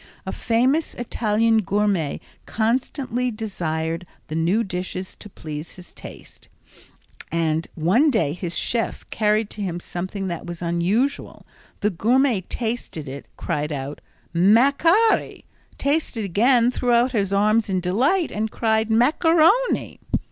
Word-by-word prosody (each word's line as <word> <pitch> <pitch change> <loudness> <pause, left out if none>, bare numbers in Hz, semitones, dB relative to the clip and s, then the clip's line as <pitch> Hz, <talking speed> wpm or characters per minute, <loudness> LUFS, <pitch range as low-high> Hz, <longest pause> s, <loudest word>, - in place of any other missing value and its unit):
A - - -3
famous 255 +7 +1
Italian 225 -1 +1
gourmet 200 -6 0 0.3
constantly 250 +2 -1
desired 170 -6 -3 0.2
new 170 +8 +1
dishes 185 -1 -5
to 210 - -11
please 155 -3 -8
his 180 -1 -14
taste, - - -13 0.8
and 165 0 0
one 195 - +3
day 220 - +1
his 175 -1 -4
chef 230 -2 -2
carried 215 0 +1
to 210 - -7
him 175 -3 -3
something 185 +3 -5
that 170 -1 -5
was 175 -1 -6
unusual. 180 +11 -1 0.4
The 210 - +2
gourmet 235 +4 +2
tasted 220 - -4
it, 135 +2 -8
cried 150 +1 -2
out 140 0 -5 0.3
"macari!" 280 - +3 0.3
Tasted 280 -6 -1
again, 235 +6 +3
threw 250 -1 -1
out 240 +2 +4
his 200 -5 0
arms 210 +2 +2
in 185 -1 +1
delight 260 - +1
and 220 +1 -2
cried 220 0 0
"macaroni!" 325 - +3
210 Hz, 125 wpm, -22 LUFS, 175-245 Hz, 0.8 s, out